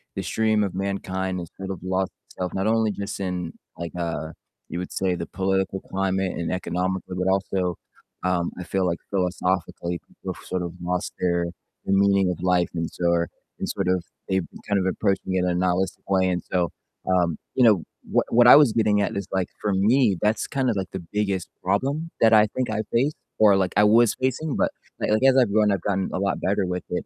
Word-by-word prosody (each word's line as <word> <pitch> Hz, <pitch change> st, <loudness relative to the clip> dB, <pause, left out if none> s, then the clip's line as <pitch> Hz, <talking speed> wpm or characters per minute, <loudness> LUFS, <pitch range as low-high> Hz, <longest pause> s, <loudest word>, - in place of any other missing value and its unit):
the -, -, -2 dB
stream 110 Hz, -1 st, +1 dB
of 95 Hz, -2 st, -3 dB
mankind 95 Hz, -1 st, -2 dB
has 85 Hz, -, -7 dB
sort 95 Hz, 0 st, -5 dB
of 95 Hz, -, -5 dB
lost 95 Hz, 0 st, -1 dB, 0.2 s
itself, 90 Hz, -2 st, -5 dB
not 95 Hz, +2 st, 0 dB
only 110 Hz, -1 st, +2 dB
just 100 Hz, 0 st, -5 dB
in 90 Hz, -3 st, -3 dB, 0.2 s
like, 85 Hz, -1 st, -5 dB
uh, 85 Hz, -2 st, -3 dB, 0.4 s
you -, -, -4 dB
would 90 Hz, -, -5 dB
say 95 Hz, -2 st, 0 dB
the 85 Hz, -, -4 dB
political 95 Hz, 0 st, -1 dB
climate 95 Hz, -1 st, -1 dB
and 85 Hz, -, -2 dB
economically, 90 Hz, 0 st, -2 dB
but 90 Hz, +1 st, 0 dB
also, 95 Hz, -2 st, 0 dB, 0.5 s
um, 90 Hz, -2 st, 0 dB
I -, -, -4 dB
feel 95 Hz, +1 st, -1 dB
like 85 Hz, -1 st, -1 dB
philosophically 90 Hz, -2 st, -1 dB
people -, -, -7 dB
have -, -, -14 dB
sort 90 Hz, -1 st, -2 dB
of 85 Hz, -1 st, -4 dB
lost 90 Hz, 0 st, -2 dB
their 85 Hz, -1 st, +1 dB, 0.4 s
the 95 Hz, -, +1 dB
meaning 100 Hz, -1 st, +4 dB
of 90 Hz, -, -3 dB
life 90 Hz, -1 st, +2 dB
and 85 Hz, -1 st, -1 dB
so 85 Hz, -1 st, 0 dB
are 85 Hz, 0 st, +1 dB, 0.3 s
and -, -, -3 dB
sort 95 Hz, -2 st, -2 dB
of 90 Hz, -2 st, +1 dB, 0.3 s
they've 95 Hz, -2 st, +1 dB, 0.2 s
kind 100 Hz, -1 st, +3 dB
of 95 Hz, -, -1 dB
approached 95 Hz, +1 st, 0 dB
me 95 Hz, 0 st, 0 dB
in 90 Hz, -, +1 dB
a 90 Hz, -, +1 dB
nihilistic 90 Hz, +1 st, 0 dB
way, 95 Hz, -1 st, +3 dB
and 90 Hz, -1 st, -1 dB
so, 90 Hz, -2 st, +1 dB, 0.4 s
um, 90 Hz, -3 st, +2 dB, 0.2 s
you 125 Hz, -, +4 dB
know, 105 Hz, -8 st, +5 dB, 0.3 s
what -, -, +3 dB
what 120 Hz, +1 st, +6 dB
I -, -, +11 dB
was 145 Hz, -6 st, +7 dB
getting 105 Hz, -2 st, +3 dB
at -, -, -1 dB
is 100 Hz, -2 st, -3 dB
like, 95 Hz, -2 st, 0 dB
for 105 Hz, -, 0 dB
me, 105 Hz, +1 st, +3 dB
that's 105 Hz, +1 st, +1 dB
kind 135 Hz, -2 st, -1 dB
of 110 Hz, -, 0 dB
like 95 Hz, -1 st, -3 dB
the 95 Hz, -2 st, -5 dB
biggest 100 Hz, -4 st, 0 dB, 0.2 s
problem 135 Hz, -, 0 dB
that 110 Hz, 0 st, +6 dB
I 105 Hz, 0 st, +7 dB
think 130 Hz, -3 st, -1 dB
I've 110 Hz, -1 st, -2 dB
faced 135 Hz, +6 st, +2 dB, 0.2 s
or 105 Hz, -2 st, +7 dB
like 95 Hz, -2 st, 0 dB
I 105 Hz, -, +6 dB
was 115 Hz, +2 st, +5 dB
facing, 130 Hz, +3 st, 0 dB
but -, -, +1 dB, 0.3 s
like -, -, 0 dB
like 110 Hz, +4 st, +2 dB
as 135 Hz, 0 st, +5 dB
I've 120 Hz, -6 st, +4 dB
grown, 105 Hz, -1 st, +4 dB
I've 95 Hz, -, 0 dB
gotten 95 Hz, -1 st, -1 dB
a -, -, -1 dB
lot 100 Hz, 0 st, 0 dB
better 100 Hz, 0 st, +1 dB
with 90 Hz, 0 st, -3 dB
it, 90 Hz, -, -2 dB
95 Hz, 220 wpm, -24 LUFS, 90-105 Hz, 0.5 s, I